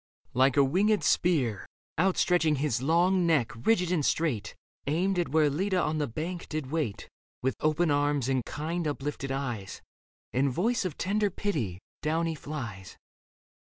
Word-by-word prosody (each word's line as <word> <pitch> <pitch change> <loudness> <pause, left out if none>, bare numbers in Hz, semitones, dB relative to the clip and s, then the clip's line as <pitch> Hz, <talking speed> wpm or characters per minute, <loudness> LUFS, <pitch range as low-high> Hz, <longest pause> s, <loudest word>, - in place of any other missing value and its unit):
Like 130 +2 +3
a 140 - +7
winged 200 +10 +2
spear, 135 - +1 0.3
Outstretching 180 -3 +3
his 135 -4 0
long 175 +5 +3
neck, 150 -8 +2
rigid 180 - +1
and 165 -5 +1
straight. 140 -9 0 0.3
Aimed 180 +5 +1
at 175 - 0
where 155 0 +4
Leda 185 +6 0
on 155 -2 0
the 145 - 0
bank 165 +9 -5
did 150 -4 -4
wait 150 -11 -2 0.4
With 130 - +1
open 155 +1 +2
arms 145 -2 +1
and 130 -2 +1
kind, 160 +5 -3
uplifted 140 -1 -3
eyes 120 -8 -4 0.5
And 135 +2 +2
voice 200 - 0
of 170 -5 -3
tender 205 +2 +1
pity, 150 - -2 0.2
down 160 +2 0
he 165 - -1
flies. 120 - -7
155 Hz, 155 wpm, -29 LUFS, 135-175 Hz, 0.5 s, a